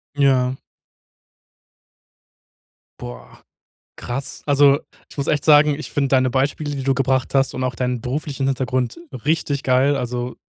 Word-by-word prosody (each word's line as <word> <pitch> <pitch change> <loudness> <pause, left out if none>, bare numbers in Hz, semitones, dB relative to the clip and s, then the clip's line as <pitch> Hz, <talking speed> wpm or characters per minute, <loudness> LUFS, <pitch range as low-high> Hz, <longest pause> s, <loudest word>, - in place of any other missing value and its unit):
Ja. 130 -3 +2 2.4
Boah, - - -10 0.6
krass. 135 +2 -6
Also, 145 -1 +5 0.3
ich - - -14
muss 140 - -2
echt 145 -2 +1
sagen, 150 -1 +5
ich 155 - -8
finde 140 -2 0
deine 130 -1 +3
Beispiele, 140 +3 -1
die 135 - -4
du 135 0 +2
gebracht 130 -1 0
hast 135 0 +2
und 130 - -3
auch 130 -2 -2
deinen 125 -1 -2
beruflichen 135 +2 -3
Hintergrund 130 +1 -1 0.3
richtig 145 -3 0
geil. 130 +2 +3
Also, 125 0 -3
135 Hz, 135 wpm, -21 LUFS, 125-145 Hz, 2.4 s, Also